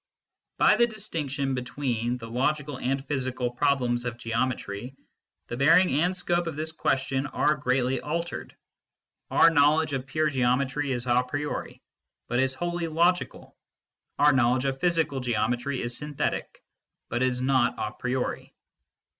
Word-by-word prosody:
" - - -62
By - - +5
the 235 - +5
distinction 150 - -3
between 125 -2 -2
the 115 -2 -9
logical 145 +3 -1
and 135 +2 -1
physical 130 -3 -2
problems 125 -2 +1
of 120 -1 -4
geometry, 115 0 -3 0.5
the 120 - -6
bearing 165 +7 +5
and 180 +2 +1
scope 175 -1 0
of 165 - -4
this 155 +1 -2
question 135 -2 -1
are 150 - +2
greatly 130 -2 0
altered. 170 +3 -4 0.7
Our 165 - +6
knowledge 150 +1 +3
of 130 -1 -3
pure 155 +3 0
geometry 135 +2 0
is 120 -1 -2
a 125 0 +3
priori 145 +3 -4 0.4
but 120 +1 0
is 130 0 +2
wholly 175 +2 -2
logical. 170 +3 0 0.6
Our 145 0 +5
knowledge 130 0 +2
of 135 -1 -1
physical 165 -5 +1
geometry 125 +2 -1
is 120 0 -3
synthetic, 150 +1 -3 0.4
but 120 +2 -2
is 130 -1 +1
not 130 -1 +2
a 105 - -3
priori. 125 +2 -3
135 Hz, 145 wpm, -27 LUFS, 125-150 Hz, 0.7 s, Our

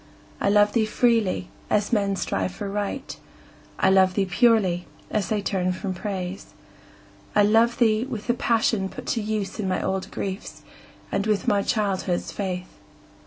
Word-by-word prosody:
I - - +1
love 205 0 +4
thee 220 -2 +2
freely, 220 -6 +1 0.2
as 210 +2 +1
men 200 -2 +2
strive 185 0 -2
for 205 - -5
Right; 205 +6 -3 0.6
I 190 - +3
love 190 -1 +4
thee 200 - +2
purely, 185 -2 +2 0.2
as 210 -3 0
they 210 -2 0
turn 185 -2 0
from 190 +1 -4
Praise. 190 0 -5 0.8
I 205 - +6
love 225 +3 +4
thee 225 -1 +3
with 235 -6 -6
the 240 - +2
passion 225 -5 +1
put 255 - -9
to 230 - -1
use 210 -1 -3
In 200 - -1
my 185 - 0
old 190 0 -2
griefs, 195 +1 -5 0.5
and 200 - 0
with 210 -3 0
my 200 -1 +3
childhood's 195 -5 -1
faith. 185 -2 -5
205 Hz, 165 wpm, -24 LUFS, 190-220 Hz, 0.8 s, I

